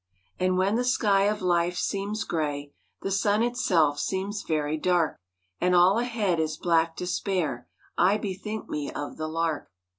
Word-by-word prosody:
And 185 Hz, 0 st, +2 dB
when 195 Hz, +4 st, +2 dB
the 245 Hz, -, +1 dB
sky 205 Hz, -5 st, +3 dB
of 210 Hz, -1 st, 0 dB
life 175 Hz, 0 st, +1 dB
seems 205 Hz, +4 st, -2 dB
grey, 145 Hz, -3 st, -3 dB, 0.3 s
The 195 Hz, -, -2 dB
sun 205 Hz, +3 st, +2 dB
itself 175 Hz, -12 st, +2 dB
seems 195 Hz, +2 st, -2 dB
very 155 Hz, -1 st, -1 dB
dark, 170 Hz, 0 st, +1 dB, 0.4 s
And 180 Hz, 0 st, +2 dB
all 185 Hz, +5 st, +5 dB
ahead 220 Hz, -8 st, 0 dB
is 155 Hz, -1 st, -1 dB
black 165 Hz, -1 st, +2 dB
despair, 180 Hz, -8 st, -2 dB, 0.3 s
I 190 Hz, +4 st, +4 dB
bethink 210 Hz, +1 st, -5 dB
me 145 Hz, -1 st, -3 dB
of 145 Hz, -, -6 dB
the 155 Hz, -, -3 dB
lark. 160 Hz, -1 st, -2 dB
180 Hz, 155 wpm, -27 LUFS, 160-205 Hz, 0.4 s, all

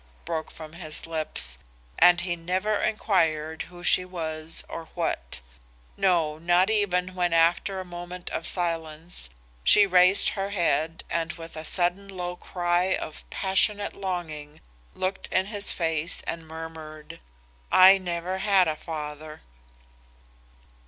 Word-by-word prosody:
broke 160 Hz, -1 st, -3 dB
from 155 Hz, -1 st, -11 dB
his 160 Hz, -3 st, -5 dB
lips, 155 Hz, -, -1 dB, 0.4 s
and 175 Hz, -1 st, +7 dB
he 175 Hz, -1 st, -1 dB
never 185 Hz, +5 st, -1 dB
inquired 160 Hz, -7 st, 0 dB
who 175 Hz, 0 st, -12 dB
she 185 Hz, -, +4 dB
was 160 Hz, -3 st, -3 dB
or 165 Hz, -, -7 dB
what; 65 Hz, +1 st, -3 dB, 0.5 s
no, 165 Hz, -5 st, +1 dB
not 175 Hz, +4 st, +3 dB
even 185 Hz, -4 st, +1 dB
when 175 Hz, -2 st, 0 dB
after 170 Hz, +4 st, +2 dB
a 185 Hz, -, -6 dB
moment 175 Hz, 0 st, -8 dB
of 165 Hz, -, -3 dB
silence 165 Hz, -, -3 dB, 0.3 s
she 210 Hz, -, +6 dB
raised 185 Hz, 0 st, +5 dB
her 195 Hz, 0 st, -3 dB
head 165 Hz, -4 st, 0 dB
and 165 Hz, -1 st, -1 dB
with 165 Hz, -1 st, -10 dB
a 155 Hz, -, -6 dB
sudden 180 Hz, +4 st, +1 dB
low 180 Hz, -2 st, -5 dB
cry 175 Hz, +1 st, 0 dB
of 155 Hz, -, -7 dB
passionate 205 Hz, +1 st, +1 dB
longing 160 Hz, -6 st, -5 dB, 0.4 s
looked 190 Hz, +1 st, -3 dB
in 185 Hz, 0 st, +2 dB
his 205 Hz, -1 st, +2 dB
face 165 Hz, -1 st, -1 dB
and 165 Hz, -1 st, -5 dB
murmured, 160 Hz, -1 st, -9 dB, 0.5 s
"'I 190 Hz, +1 st, +8 dB
never 180 Hz, +1 st, -3 dB
had 195 Hz, -2 st, +4 dB
a 155 Hz, -, 0 dB
father. 155 Hz, -1 st, -7 dB
175 Hz, 130 wpm, -26 LUFS, 160-185 Hz, 0.5 s, I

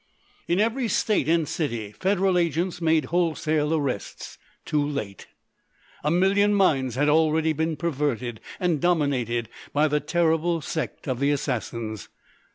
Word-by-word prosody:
In 175 Hz, +2 st, +1 dB
every 230 Hz, +3 st, +1 dB
state 210 Hz, -9 st, +1 dB
and 165 Hz, -2 st, +2 dB
city 120 Hz, -11 st, -3 dB
Federal 190 Hz, -, +1 dB
agents 175 Hz, +1 st, 0 dB
made 160 Hz, -3 st, +2 dB
wholesale 155 Hz, -3 st, +1 dB
arrests—too 145 Hz, +1 st, -3 dB
late! 140 Hz, -10 st, -5 dB, 0.8 s
A 150 Hz, -, +1 dB
million 195 Hz, +4 st, +3 dB
minds 135 Hz, -, +2 dB
had 145 Hz, +3 st, +2 dB
already 160 Hz, +1 st, +3 dB
been 160 Hz, +1 st, -1 dB
perverted 135 Hz, -7 st, -2 dB, 0.2 s
and 175 Hz, -6 st, 0 dB
dominated 135 Hz, -9 st, +1 dB, 0.3 s
by 150 Hz, +2 st, +3 dB
the 150 Hz, 0 st, +1 dB
terrible 165 Hz, +2 st, +1 dB
Sect 155 Hz, 0 st, -5 dB
of 130 Hz, -2 st, -2 dB
the 140 Hz, +1 st, +2 dB
Assassins. 115 Hz, -6 st, -3 dB
155 Hz, 130 wpm, -25 LUFS, 140-175 Hz, 0.8 s, million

